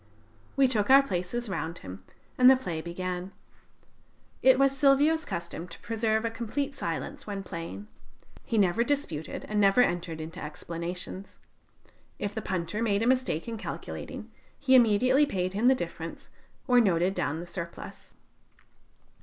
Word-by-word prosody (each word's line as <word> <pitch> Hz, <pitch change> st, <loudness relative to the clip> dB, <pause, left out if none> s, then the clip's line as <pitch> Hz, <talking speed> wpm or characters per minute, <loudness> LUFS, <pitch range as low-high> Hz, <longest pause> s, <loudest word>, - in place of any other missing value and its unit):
We 275 Hz, -1 st, +5 dB
took 220 Hz, -4 st, +1 dB
our 275 Hz, +1 st, +8 dB
places 205 Hz, +2 st, -3 dB
round 165 Hz, -3 st, -4 dB
him, 95 Hz, 0 st, -10 dB, 0.3 s
and 255 Hz, 0 st, +7 dB
the 265 Hz, -, +8 dB
play 175 Hz, -11 st, -4 dB
began. 180 Hz, +2 st, -5 dB, 1.1 s
It 260 Hz, 0 st, +6 dB
was 275 Hz, 0 st, +3 dB
Silvio's 290 Hz, +4 st, +4 dB
custom 170 Hz, -2 st, -5 dB
to 170 Hz, -, -12 dB
preserve 225 Hz, -1 st, 0 dB
a 230 Hz, -, -1 dB
complete 250 Hz, +5 st, -3 dB
silence 170 Hz, -, -4 dB
when 200 Hz, -1 st, -4 dB
playing. 170 Hz, +4 st, -7 dB, 0.6 s
He 230 Hz, -, -2 dB
never 200 Hz, +3 st, +3 dB
disputed, 240 Hz, -, -2 dB
and 210 Hz, 0 st, -1 dB
never 200 Hz, +3 st, +4 dB
entered 175 Hz, -5 st, -2 dB
into 160 Hz, +1 st, -7 dB
explanations. 175 Hz, +5 st, -6 dB, 0.8 s
If 205 Hz, 0 st, -3 dB
the 220 Hz, -, -3 dB
punter 185 Hz, +2 st, -3 dB
made 210 Hz, -2 st, +1 dB
a -, -, +1 dB
mistake 250 Hz, -10 st, +1 dB
in 230 Hz, -1 st, -4 dB
calculating, -, -, -7 dB, 0.3 s
he 270 Hz, -2 st, +2 dB
immediately 255 Hz, +4 st, +5 dB
paid 185 Hz, -6 st, -2 dB
him 215 Hz, +5 st, +2 dB
the 265 Hz, -, +6 dB
difference 170 Hz, -6 st, -6 dB, 0.4 s
or 250 Hz, -1 st, +6 dB
noted 185 Hz, -3 st, +2 dB
down 155 Hz, -4 st, -2 dB
the 170 Hz, -, -6 dB
surplus. 170 Hz, -1 st, -8 dB
205 Hz, 150 wpm, -28 LUFS, 175-250 Hz, 1.1 s, our